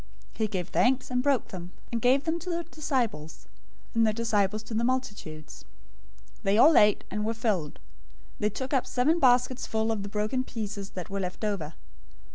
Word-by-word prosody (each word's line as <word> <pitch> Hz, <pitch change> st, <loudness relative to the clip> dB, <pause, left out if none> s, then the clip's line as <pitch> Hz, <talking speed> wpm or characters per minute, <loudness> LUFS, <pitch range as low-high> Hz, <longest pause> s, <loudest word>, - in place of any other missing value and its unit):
He 220 Hz, -, -1 dB
gave 185 Hz, -4 st, -3 dB
thanks 255 Hz, +1 st, +2 dB
and 250 Hz, 0 st, +1 dB
broke 275 Hz, -2 st, +1 dB
them, 180 Hz, -1 st, -8 dB, 0.2 s
and 230 Hz, -1 st, -1 dB
gave 260 Hz, +4 st, +4 dB
to 320 Hz, -, 0 dB
the 340 Hz, 0 st, -3 dB
disciples, 240 Hz, -, -2 dB, 0.5 s
and 230 Hz, -1 st, +3 dB
the -, -, +3 dB
disciples 215 Hz, -2 st, 0 dB
to 220 Hz, -, -8 dB
the 225 Hz, +2 st, 0 dB
multitudes. 205 Hz, -12 st, -3 dB, 0.8 s
015:037 -, -, -29 dB
They 195 Hz, +1 st, +2 dB
all 305 Hz, +7 st, +7 dB
ate, 210 Hz, -1 st, +5 dB
and 210 Hz, +2 st, -2 dB
were 225 Hz, +2 st, -1 dB
filled. 205 Hz, -10 st, -1 dB, 0.6 s
They 210 Hz, -, +2 dB
took 260 Hz, +6 st, -5 dB
up 265 Hz, -, +2 dB
seven 300 Hz, +7 st, +2 dB
baskets 250 Hz, -1 st, +3 dB
full 220 Hz, 0 st, 0 dB
of 220 Hz, -2 st, -1 dB
the 200 Hz, -, -5 dB
broken 215 Hz, +5 st, -1 dB
pieces 210 Hz, -5 st, -5 dB
that 180 Hz, +1 st, -5 dB
were 200 Hz, -, -2 dB
left 185 Hz, +2 st, -4 dB
over. 170 Hz, -7 st, -3 dB
220 Hz, 185 wpm, -28 LUFS, 200-255 Hz, 0.8 s, all